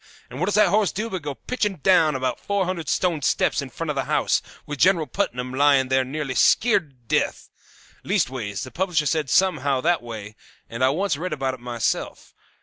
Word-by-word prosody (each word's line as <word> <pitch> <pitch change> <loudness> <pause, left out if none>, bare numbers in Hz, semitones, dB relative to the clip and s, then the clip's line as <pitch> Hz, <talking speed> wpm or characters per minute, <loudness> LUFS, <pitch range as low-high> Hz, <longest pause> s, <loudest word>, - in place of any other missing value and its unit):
And 130 - -7
what 180 - 0
does 205 - 0
that 210 -3 +5
horse 200 -3 +2
do 220 +3 -4
but 185 -2 -3
go 145 -1 -5
pitching 210 - -2
down 160 -3 +3
about 130 -1 -2
four 200 -2 -1
hundred 170 -5 -4
stone 170 -5 0
steps - - +1
in - - -7
front - - -4
of - - -5
the - - -1
house, - - +1 0.2
with 145 -2 -6
General 175 -3 +4
Putnam 125 -9 -3
lying 135 -1 +3
there 130 0 +3
nearly 135 +1 -4
skeered 205 -9 +3
to 135 - -28 0.2
death! - - -5 0.5
Leastways, 110 -7 -1
the 130 - -8
publisher 175 -4 0
said 150 -1 0
somehow 145 -6 +2
that 170 +3 +2
way, 110 -3 -8 0.3
and 115 +2 -4
I 130 - +5
once 165 +1 0
read 180 +2 -3
about 135 -3 -2
it 130 - -9
myself. 120 -1 -3
150 Hz, 205 wpm, -23 LUFS, 130-185 Hz, 0.5 s, that